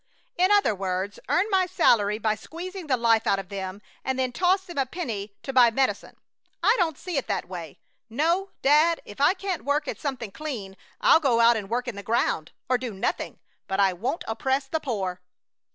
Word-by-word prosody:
"In 370 -3 +3
other 405 - +4
words, 190 +1 -3
earn 365 - +3
my 375 -2 +3
salary 215 - +3
by 215 -1 +1
squeezing 345 - -8
the 260 -3 +2
life 230 -1 +3
out 195 - +3
of 195 -2 -6
them 195 0 -6 0.2
and 265 0 -1
then 260 -1 0
toss 370 +7 +2
them 345 -6 -5
a 265 - +1
penny 220 - -5
to 270 - -5
buy 250 -2 +7
medicine. 265 +3 -1 0.5
I 425 +6 +5
don't 320 -5 +1
see 360 -4 -4
it 270 - -1
that - - -2
way! 170 -5 -8 0.3
No, 335 - +1
dad, 305 +4 +5
if 205 +6 -9
I 335 +7 +5
can't 375 -2 -3
work 290 +1 0
at - - -4
something 255 -7 -4
clean 220 -9 -6 0.3
I'll - - +6
go 260 -7 +2
out 235 0 +6
and 205 -3 -4
work 245 +2 -1
in 230 -4 -4
the - - -5
ground, 200 -7 0 0.2
or 255 -1 +2
do 245 -5 -5
nothing, 190 - -2 0.3
but 195 - -2
I 195 -2 +4
won't 250 - -3
oppress 265 +4 0
the 320 +4 -2
poor." 195 -10 -3
255 Hz, 205 wpm, -26 LUFS, 205-320 Hz, 0.5 s, buy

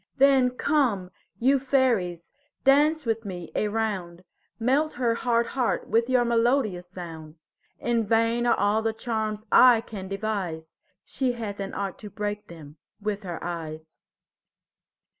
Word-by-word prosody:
Then 270 -2 +5
come, 250 -8 0 0.3
you 265 +5 +3
fairies, 235 -11 0 0.3
dance 295 +3 +4
with 225 -1 -1
me 180 -4 -7
a 215 - 0
round; 195 -5 -3 0.4
Melt 275 +7 +1
her 240 -2 +1
hard 235 0 +1
heart 255 -4 -1
with 230 +2 +2
your 250 -2 +3
melodious 230 -6 +1
sound. 165 -4 -9 0.4
In 235 -1 0
vain 230 +2 +2
are - - +3
all 210 +2 +2
the 225 0 -1
charms 220 -2 -3
I 250 -2 +7
can 205 -5 -8
devise; 195 -6 -4 0.3
She 260 -2 -1
hath 215 -4 -6
an 195 - -5
art 195 -3 -4
to 210 - -8
break 205 +1 -4
them 155 -3 -12 0.2
with 210 -1 -3
her 175 -4 -5
eyes. 160 -2 -6
220 Hz, 140 wpm, -26 LUFS, 185-245 Hz, 0.4 s, I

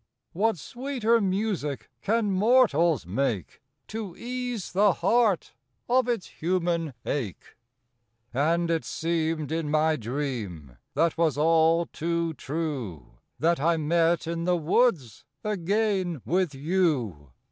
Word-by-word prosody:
_ - - -46 0.3
What 215 +3 +1
sweeter 240 - 0
music 190 -7 -1
can 220 -1 +1
mortals 185 - +3
make 105 0 -2 0.3
To 215 -5 -5
ease 245 -3 -4
the 200 +1 +4
heart 210 +1 +2 0.3
of 250 0 +3
its 235 -6 -1 0.2
human 170 -4 0
ache! 115 - -4 0.8
And 165 +6 +1
it 165 -1 0
seemed 160 -2 -1
in 160 -2 -1
my 155 +1 +2
dream, 110 - -4 0.2
that 165 0 +1
was 160 -4 +2
all 165 +2 +4
too 170 +1 -2
true, 135 - -5 0.2
That 170 0 +2
I 165 +3 +2
met 165 +2 +2
in 165 0 -3
the 180 0 +2
woods 165 - +1 0.2
again 195 - 0
with 180 -4 0
you. 135 - 0
165 Hz, 120 wpm, -27 LUFS, 150-195 Hz, 0.8 s, the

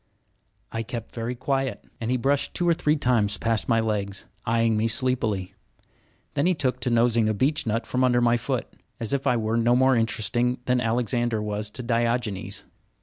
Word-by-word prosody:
I 115 - -2
kept 115 0 -6
very 120 +1 -3
quiet, 135 -2 -2 0.2
and 115 - -2
he 130 - +2
brushed 140 +3 0
two 175 - 0
or 170 - +5
three 150 -1 +1
times 115 -7 +1
past 115 -1 0
my 115 -1 +4
legs, 100 -3 -2 0.2
eyeing 115 0 +2
me 110 +1 +1
sleepily. 110 -6 +1 0.8
Then 145 +4 +1
he 185 - +3
took 130 -4 0
to - - -1
nosing 115 -1 +3
a 110 - 0
beechnut 120 -2 0
from 130 0 0
under 125 -1 +4
my 120 -1 +3
foot, 115 - -2 0.3
as 115 +1 -3
if 140 -1 0
I 125 - +3
were 110 0 0
no 120 +1 +3
more 130 +1 +4
interesting 115 +2 0
than 125 0 +2
Alexander 120 0 0
was 105 0 -3
to 125 +4 -6
Diogenes. 115 -3 -1
115 Hz, 185 wpm, -25 LUFS, 110-125 Hz, 0.8 s, or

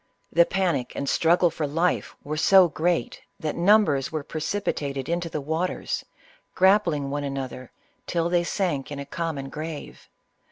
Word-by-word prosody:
The 170 +1 +5
panic 170 -10 0
and 140 - -3
struggle 170 +4 +3
for 150 -1 -2
life 165 +5 0
were 150 +2 -3
so 185 +4 +6
great 170 +2 -1 0.2
that 155 -1 -3
numbers 170 -8 +3
were 155 -2 -3
precipitated 145 -5 -3
into 170 0 -1
the 155 - -3
waters, 160 +5 -2 0.5
grappling 180 -8 +3
one 145 0 -2
another, 135 -2 -5 0.4
till 170 -1 0
they 175 0 +2
sank 165 -7 -2
in 145 - -4
a 140 - -5
common 145 -2 -4
grave. 155 +1 -7
160 Hz, 150 wpm, -25 LUFS, 140-175 Hz, 0.5 s, so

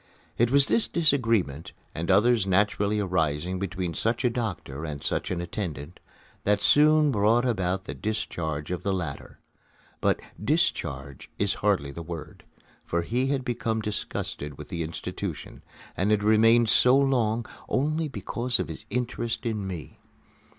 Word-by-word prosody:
It 120 0 +3
was 140 +1 +5
this 230 - +2
disagreement, 115 - +1 0.2
and 85 +3 -4
others 105 +2 +4
naturally 100 +2 +2
arising 90 -2 0
between 95 -3 -3
such 115 - 0
a 120 - +3
doctor 100 - -4
and 75 -3 -5
such - - -1
an 90 -2 -2
attendant, 85 -4 -5 0.4
that 105 0 +2
soon 150 0 +5
brought 110 +2 +3
about 95 -5 0
the - - -6
discharge 85 -8 -3
of 90 - -2
the 100 - -1
latter. 85 -7 -5 0.6
But - - +2 0.2
"discharge" 70 0 -1
is - - +2
hardly 70 0 +1
the 85 - -7
word, 85 -1 -8 0.4
for 85 0 -1
he 125 +8 0
had 135 -2 -1
become 115 -3 -1
disgusted 105 -8 -3
with 75 - -9
the 85 -3 -3
institution, 80 0 -5 0.3
and 95 +3 0
had 105 -1 +2
remained 115 +2 +5
so 125 +4 +5
long 120 -5 +1 0.2
only 155 +4 0
because 125 -3 -1
of - - -2
his - - -7
interest 120 +1 -2
in 105 -4 -2
me. 90 -5 -7
105 Hz, 150 wpm, -26 LUFS, 85-120 Hz, 0.6 s, was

